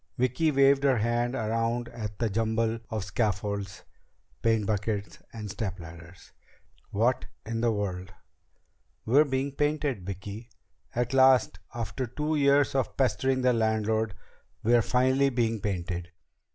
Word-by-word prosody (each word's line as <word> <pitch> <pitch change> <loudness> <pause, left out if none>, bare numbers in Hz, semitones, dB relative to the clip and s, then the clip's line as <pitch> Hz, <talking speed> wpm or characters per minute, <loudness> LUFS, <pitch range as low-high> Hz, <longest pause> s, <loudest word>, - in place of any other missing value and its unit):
Vicki 130 +6 +2
waved 140 -1 +4
her 135 -3 +4
hand 120 +3 0
around 115 +1 -1
at 110 -4 -6
the 115 - 0
jumble 110 +2 0
of 110 -4 -2
scaffolds, 100 -1 -2 0.6
paint 115 -2 +2
buckets, 105 0 -2
and 110 -2 -6
stepladders. 85 -4 -7 0.6
"What 120 +5 +1 0.2
in 115 +1 -3
the 120 -1 +3
world 95 -3 -3 0.5
...?" - - -44
"We're 140 +7 +5
being 135 0 -1
painted, 145 -6 -1
Vicki! 100 +5 -7 0.5
At 120 +2 -1
last, 130 -1 +5 0.2
after 120 +2 -3
two 150 +6 -2
years 140 -1 +4
of 135 -2 -1
pestering 130 0 +1
the 125 -1 +4
landlord, 110 -1 0 0.5
we're 120 +1 +5
finally 130 +4 +2
being 115 -3 0
painted! 90 -3 -3
115 Hz, 130 wpm, -28 LUFS, 105-130 Hz, 0.6 s, We're